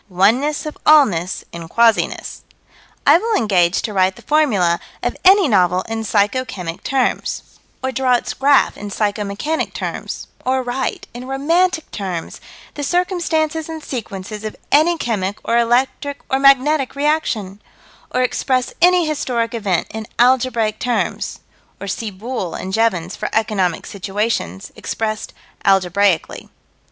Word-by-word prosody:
Oneness 230 - +2
of 305 - -7
allness 205 - +4
in 170 -1 -8
quasiness. 230 +4 +1 0.6
I - - +7
will 450 +2 0
engage 185 - +2
to 215 - -3
write 190 -1 +2
the - - -15
formula 210 - +2 0.2
of - - -1
any 380 -1 +6
novel 185 -5 +3
in 225 0 -4
psycho 210 +4 +1
chemic 180 -8 -6
terms, 265 -3 -1 0.4
or 260 - 0
draw 255 0 +2
its 240 - -2
graph 280 0 +3
in 205 - -6
psycho 205 +1 -1
mechanic 250 +11 -3
terms: - - -5 0.2
or 260 0 0
write, 255 +2 -3
in 245 +1 -8
romantic 320 +5 +1
terms, 185 -5 -5 0.3
the 290 - -6
circumstances 320 -2 0
and 320 -1 -6
sequences 215 -5 -6
of 215 - -5 0.2
any 325 +4 +4
chemic 205 -7 -2
or 235 +1 +2
electric 260 +4 0
or 265 - +2
magnetic 275 +1 +4
reaction: 265 -10 -1 0.5
or 255 - +1
express 255 0 0
any 360 0 +5
historic 250 -6 -1
event 200 -7 0
in 220 -1 -6
algebraic 240 -3 +2
terms 245 -1 -2 0.4
or 200 - -6
see 215 +3 -3
Boole 200 -2 -5
and 190 - -5
Jevons 190 -5 +1
for - - -4
economic 200 -6 0
situations 195 - -3
expressed 215 -1 -3 0.3
algebraically. 195 -2 +1
230 Hz, 140 wpm, -19 LUFS, 200-280 Hz, 0.6 s, I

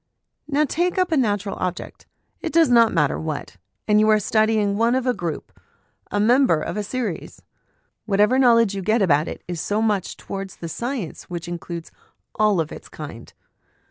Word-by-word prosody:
Now 300 0 +2
take 350 +6 -1
up 365 -2 +1
a - - +3
natural 205 -7 0
object, 180 -1 -5 0.3
it 330 - -3
does 330 -3 +4
not 230 -2 +5
matter 150 -4 +1
what, 155 -9 -5 0.3
and 210 0 +4
you 215 0 +4
are 215 0 +5
studying 215 -1 +2
one 230 +3 +2
of 260 -1 0
a 250 - +2
group, 170 -8 -5 0.6
a 205 - -1
member 240 - +4
of - - -4
a 210 - -1
series; 210 -4 -5 0.6
whatever 210 +5 +3
knowledge 230 -5 +5
you 195 - -3
get 215 +3 +2
about 150 -3 +3
it - - -7
is 175 -3 -4
so 205 +1 -1
much 210 -4 0
towards 195 -1 -6
the 170 - -7
science 235 - -4
which 175 -1 -6
includes 170 -1 -6 0.4
all 210 -4 +2
of 160 -1 -2
its - - -10
kind. 145 -7 -9
210 Hz, 180 wpm, -22 LUFS, 175-240 Hz, 0.6 s, not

